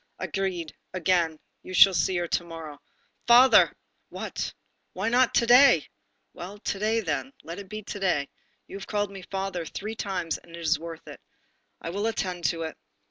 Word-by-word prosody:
"Agreed 185 -5 -3 0.2
again, 170 -2 +1 0.2
you 185 - -7
shall 195 +1 +8
see 175 +2 +1
her 175 0 -1
to 175 - 0
morrow." 165 -4 -9 0.5
"Father!" 245 +2 +7 0.4
"What?" - - -4 0.4
"Why 195 +4 -1
not 245 +1 +3
to 235 - +4
day?" 240 - +7 0.5
"Well, 190 +4 -8
to 205 -1 -3
day 220 +2 +1
then. 185 - -3
Let 170 +3 -7
it 195 -2 -10
be 215 +1 -6
to 205 - -6
day. 175 -8 +1 0.4
You - - -8
have 200 - -9
called 205 -1 -1
me 195 -1 -9
'father' 190 -1 -4
three 210 +7 -6
times, 185 -6 -3
and 170 0 -14
it - - -9
is 165 0 +1
worth 165 0 -9
it. - - -10 0.6
I 165 - -5
will 205 +4 -1
attend 180 -6 -3
to 165 +3 0
it. 160 - -6
185 Hz, 185 wpm, -26 LUFS, 165-205 Hz, 0.6 s, shall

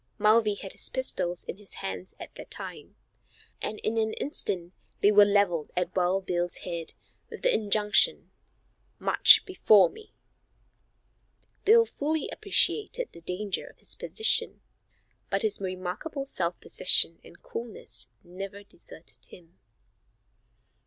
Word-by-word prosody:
Mulvey 215 0 +3
had 195 -1 -8
his - - -5
pistols 175 -9 -2
in - - -7
his 205 -1 -10
hands 195 -1 -6
at - - -10
the - - -10
time, - - -8 0.7
and 215 - -4
in 225 +1 -1
an 220 0 0
instant 185 - +1 0.3
they 205 - +5
were 205 0 +7
leveled 200 -6 +1
at 180 0 -1
Wild 185 +1 +1
Bill's 175 -1 -2
head, 170 -2 -5 0.3
with - - -10
the - - +3
injunction, 210 0 +3 0.7
"March - - +6
before 215 - +5
me." 435 - -15 1.5
Bill 460 +3 +6
fully 310 -4 -2
appreciated 440 +3 0
the 170 - -13
danger 185 +4 -3
of - - -16
his - - -4
position, 440 - -1 0.7
but - - 0
his 435 - -1
remarkable 185 - -5
self 175 -9 -2
possession 170 -2 +3
and 170 - -17
coolness 165 - -7 0.2
never 195 +3 -8
deserted 170 -4 -11
him. 170 -1 -17
200 Hz, 130 wpm, -27 LUFS, 180-230 Hz, 1.5 s, were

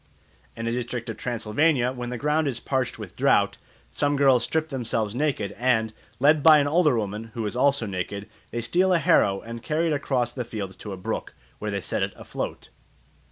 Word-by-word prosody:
In 115 - -4
a 115 - 0
district 120 -1 -3
of - - -9
Transylvania 125 +3 +1
when 125 -2 -5
the 125 - -4
ground 150 +4 +1
is 125 -4 -2
parched 130 -1 -1
with - - -9
drought, - - +3 0.3
some 145 0 +1
girls 135 -4 +5
strip 160 +4 -1
themselves 115 -6 -1
naked, 120 -7 -1
and, 110 -3 +2 0.3
led 150 +3 +5
by 155 0 +8
an 145 -1 +2
older 150 -4 +3
woman, 105 +1 -3
who 115 -2 -2
is 105 - -3
also 140 -1 +2
naked, 100 +1 -4 0.2
they 120 - -3
steal 180 +11 +2
a - - +5
harrow 105 - +3
and 115 +1 -8
carry 155 +6 0
it - - +2
across 125 -4 0
the 125 - -3
fields 105 -5 -6
to 105 - -8
a 95 - -5
brook, 90 - -4 0.2
where 105 - -3
they 100 -1 -2
set - - -2
it - - -1
afloat. - - -6
120 Hz, 205 wpm, -25 LUFS, 110-145 Hz, 0.3 s, by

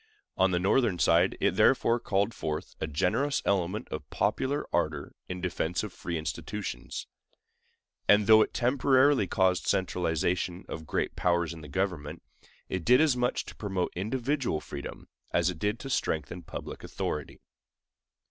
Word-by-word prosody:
On 95 0 +3
the 90 - +1
Northern 95 +2 +2
side 85 +2 +3
it - - +3
therefore 115 +1 +3
called 100 -1 0
forth 75 -1 -4
a - - -1
generous 90 - +1
element 95 +1 0
of - - -6
popular 145 +3 0
ardor 75 -4 -1 0.2
in 90 0 -4
defense 90 0 -1
of 105 -4 -6
free 85 -1 -4
institutions; 80 - -5 1.0
and 105 0 +6
though 110 +1 +8
it - - +1
temporarily 130 -1 +3
caused 95 -2 +1
centralization 90 0 0
of 80 -1 -7
great - - -1
powers 85 -2 +1
in 80 - -10
the 75 - -9
government, 85 -2 -3 0.4
it 95 -2 -3
did 125 +6 +6
as 155 -4 +4
much 125 0 0
to - - -10
promote 95 -4 -2
individual 120 - -1
freedom - - -8 0.3
as 85 +1 +3
it 85 - -10
did 105 +5 0
to 135 - -6
strengthen 80 - -1
public - - -8
authority. 75 -1 -4
95 Hz, 150 wpm, -29 LUFS, 85-115 Hz, 1.0 s, though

